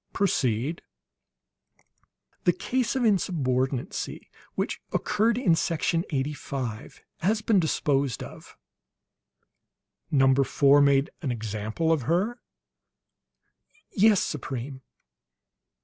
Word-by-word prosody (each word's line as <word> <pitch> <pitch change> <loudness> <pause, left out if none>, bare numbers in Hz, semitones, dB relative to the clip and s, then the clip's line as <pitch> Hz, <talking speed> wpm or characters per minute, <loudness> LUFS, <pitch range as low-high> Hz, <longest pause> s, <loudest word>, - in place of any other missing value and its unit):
"Proceed." 140 - 0 1.6
"The 175 - +5
case 250 +8 -1
of 260 - 0
insubordinancy 135 - -1 0.2
which - - -2
occurred 225 +2 +1
in 200 -9 +3
Section 165 +1 0
Eighty 140 0 -1
five 125 -6 -6 0.2
has 215 +5 0
been 215 -4 +3
disposed 140 -5 0
of." - - -12 1.5
"Number 135 -1 +4
Four 140 +2 +4
made 140 0 +3
an 140 -6 -2
example 110 +7 -2
of 155 - 0
her?" 210 +9 0 1.5
"Yes, 210 -1 +4
Supreme." 130 -2 -5
145 Hz, 90 wpm, -26 LUFS, 130-185 Hz, 1.6 s, The